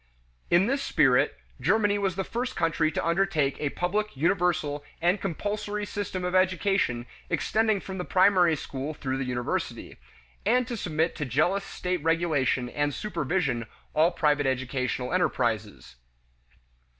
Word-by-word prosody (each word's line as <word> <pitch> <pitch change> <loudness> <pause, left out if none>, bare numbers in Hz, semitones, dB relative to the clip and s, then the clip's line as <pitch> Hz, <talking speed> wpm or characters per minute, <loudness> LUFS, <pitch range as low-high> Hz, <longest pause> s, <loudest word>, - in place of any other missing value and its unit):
In 175 +3 +5
this 275 +4 0
spirit, 125 - +3 0.2
Germany 205 +1 +2
was 195 -3 0
the 190 - -1
first 245 +5 -3
country 165 -1 +1
to - - -2
undertake 170 -5 +1
a 150 - 0
public, 200 +2 -2
universal, 160 -3 +1 0.2
and 175 +4 +2
compulsory 205 +3 -3
system 200 -3 -4
of 180 - -2
education 185 -9 +2 0.2
extending 220 -2 +1
from 190 0 -7
the - - -1
primary 185 -3 +4
school 140 +1 -5
through 135 -2 -3
the 135 - -2
university, 120 -1 -3 0.5
and 250 0 +3
to 240 - -4
submit 165 -5 -1
to 150 - -2
jealous 155 - +1
state 180 -2 -3
regulation 160 -6 +1
and 145 +3 -1
supervision 160 - -1 0.3
all 160 +2 +4
private 150 -5 +1
educational 130 0 -2
enterprises. 110 - -1
170 Hz, 140 wpm, -27 LUFS, 140-195 Hz, 0.5 s, In